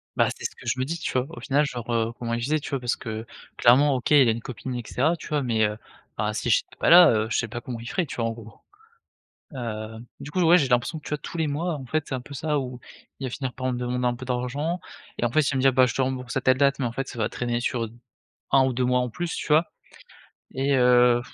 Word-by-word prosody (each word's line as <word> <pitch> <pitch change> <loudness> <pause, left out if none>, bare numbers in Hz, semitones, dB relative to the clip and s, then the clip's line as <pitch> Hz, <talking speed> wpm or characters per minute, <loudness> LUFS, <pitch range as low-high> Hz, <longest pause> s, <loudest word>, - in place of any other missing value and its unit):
Bah, - - +3
c'est - - -8
ce - - -3
que - - -15
je - - -1
me 130 - 0
dis, 165 +5 -3
tu - - -3
vois? 125 - +1
Au - - -9
final 145 +1 +2
genre, 120 -3 -6
heu, 115 0 +1
comment 115 -1 -3
il 120 - -1
faisait, 150 +6 +1
tu - - -7
vois? 135 - -1
Parce 120 -1 -1
que 110 0 -6 0.3
clairement, 135 +4 +5
OK, 125 - -3
il 140 -4 +7
a - - +5
une 115 - -3
copine 130 +2 -6
et 120 - -3
cetera, 155 +7 +1
tu - - -10
vois? 150 -1 0
Mais 115 -3 +2
heu, 105 0 -2 0.4
bah - - -1
si - - -2
j'étais - - +1
pas - - +2
là, 175 0 +9
heu, 110 -1 +1
je - - 0
sais 115 - -1
pas 120 - -5
comment 120 -1 -6
il 120 - -7
ferait, 180 - 0
tu - - -8
vois? 120 - -2
En 115 - 0
gros, 115 -2 -10 1.0
heu, 110 -3 -5 0.2
du 145 - -7
coup, 180 +4 0
ouais 170 +1 +7
j'ai 140 -5 +1
l'impression 125 +6 +1
que, 150 - -16
tu - - -7
vois? 150 - 0
Tous 170 - -8
les 160 - +1
mois 155 +5 -1
en 135 -3 -7
fait, 155 +4 -1
c'est - - -4
un 130 - -2
peu 140 +3 -11
ça. 150 +2 -1
Où 125 -2 -5 0.4
il 135 - -4
va - - -4
finir 130 0 -4
par 130 0 -2
me 125 - -3
demander 125 0 -1
un 120 - +1
peu 130 +1 -9
d'argent 130 +7 -2 0.4
et - - -2
en 120 - 0
fait, 155 - +4
il 145 - +1
va - - -1
me 130 - +1
dire: 130 -1 +5
«Je 120 - -3
te 135 - +1
rembourse 130 -1 -3
à 135 - +1
telle 130 0 +3
date», 140 0 +3
mais - - 0
en 115 - -3
fait 135 +3 -4
ça - - -8
va 110 - 0
traîner 120 -1 -2
sur 120 -2 -1 0.6
1 135 -1 +5
ou 130 - 0
2 125 +1 0
mois 125 0 +2
en 125 -1 -2
plus, 175 +8 -4
tu - - -5
vois? 155 +2 +4 0.9
Et 135 +1 +1
heu, 125 -1 +5
130 Hz, 300 wpm, -25 LUFS, 120-140 Hz, 1.0 s, là